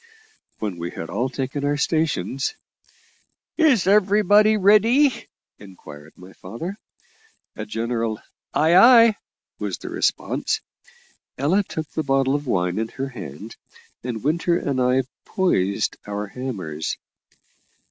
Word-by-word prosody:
When 105 -5 -4
we 85 +1 -4
had 80 - -7
all 130 +3 -1
taken 135 +2 -4
our 145 0 0
stations 145 - -1 1.0
"Is 280 - +3
everybody 210 +2 +4
ready?" 225 +6 +4 0.3
inquired 80 -6 -13
my 90 +1 -14
father. 165 - -7 0.8
A - - -6
general 115 - -2 0.3
"Ay, 160 +3 +3
ay," 230 +2 +7 0.4
was 100 -4 -3
the - - -8
response. - - -1 0.8
Ella 155 +10 +2
took 160 -5 -6
the 160 - -2
bottle 135 -2 +1
of 145 -1 -2
wine 90 -3 0
in 110 - -1
her 135 +3 -5
hand, 100 - -9 0.5
and 120 -3 -5
Winter 170 +4 +1
and 135 -5 -1
I 125 +1 +2 0.2
poised 100 - 0
our 105 0 -3
hammers. 95 -10 -5
135 Hz, 120 wpm, -22 LUFS, -, 1.0 s, ay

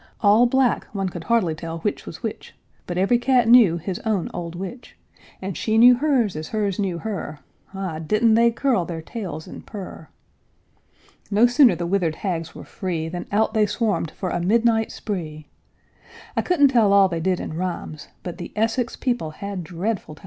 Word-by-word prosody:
All 215 +4 +5
black, 260 -1 +2
one 195 -2 -1
could 175 -2 -8
hardly 225 -9 +2
tell 165 +1 -6
which 210 - -3
was - - -9
which, - - -6 0.3
But 175 - -4
every 195 +6 +3
cat 245 -2 +3
knew 225 -8 +6
his 180 +2 -4
own 215 -6 -1
old 170 -1 -5
witch; 195 +8 -8 0.5
And 190 -2 -4
she 220 0 0
knew 245 +2 +8
hers 245 - +1
as 155 0 -5
hers 205 -3 -2
knew 190 -4 -1
her, 170 -6 -5 0.3
Ah, 185 -5 -4
didn't 215 +8 +2
they 235 +1 +5
curl 235 -4 +1
their 165 -1 -6
tails 175 -7 -6
and - - -10
purr! 190 -6 -9 1.2
No 215 +3 +4
sooner 245 0 +5
the 175 - -3
withered 170 -3 0
hags 165 -4 -4
were - - -9
free 170 -5 -4
Than 175 +1 -6
out 220 +2 +1
they 215 -2 +3
swarmed 210 -5 -1
for 185 +2 -5
a - - -1
midnight 225 +3 +2
spree; 155 -7 -5 0.9
I - - +2
couldn't 290 -6 +4
tell 225 -6 +4
all 200 -1 +6
they 170 -3 -3
did 185 +1 0
in - - -5
rhymes, 170 -3 -5 0.2
But 175 - -7
the - - -7
Essex 225 +3 0
people 240 -10 -2
had 195 +3 -6
dreadful 180 0 -4
times. - - -19
200 Hz, 185 wpm, -23 LUFS, 170-230 Hz, 1.2 s, knew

